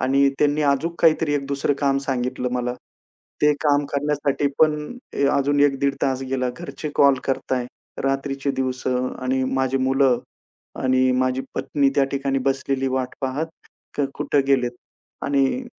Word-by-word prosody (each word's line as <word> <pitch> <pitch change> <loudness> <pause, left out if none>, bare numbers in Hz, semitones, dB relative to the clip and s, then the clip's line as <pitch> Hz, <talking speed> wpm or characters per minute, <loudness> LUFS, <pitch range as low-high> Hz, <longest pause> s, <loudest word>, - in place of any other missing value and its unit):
आणि 135 +2 +3
त्यांनी 150 +1 +2
अजून 155 +5 0
काहीतरी 160 -2 +4
एक 140 -1 -1
दुसरं 140 +1 0
काम 140 -1 +2
सांगितलं 125 -1 -1
मला. 125 0 -1 0.7
ते 150 0 +6
काम 145 -1 +3
करण्यासाठी 145 -1 0
पण 155 -1 +4 0.4
अ, 140 - +2
अजून 145 +1 +1
1 140 -1 +3
दीड 140 0 +2
तास 135 -1 0
गेला. 130 -1 0
घरचे 140 +2 -6
कॉल 140 -1 +6
करताय, 130 -2 -1 0.4
रात्रीचे 135 0 -1
दिवस 130 -1 -3
आणि 130 +1 -1
माझी 135 0 +1
मुलं 130 -1 +3 0.6
आणि 130 0 +3
माझी 130 0 +1
पत्नी 140 -2 +1
त्या 140 - +4
ठिकाणी 135 0 0
बसलेली 135 0 0
वाट 130 -1 -2
पाहत 135 +4 -1 0.5
का 145 - +2
कुठे 145 - +1
गेलेत 135 -3 +2 0.5
आणि 140 -1 +3 0.2
अ, - - -11
135 Hz, 150 wpm, -22 LUFS, 130-145 Hz, 0.7 s, ते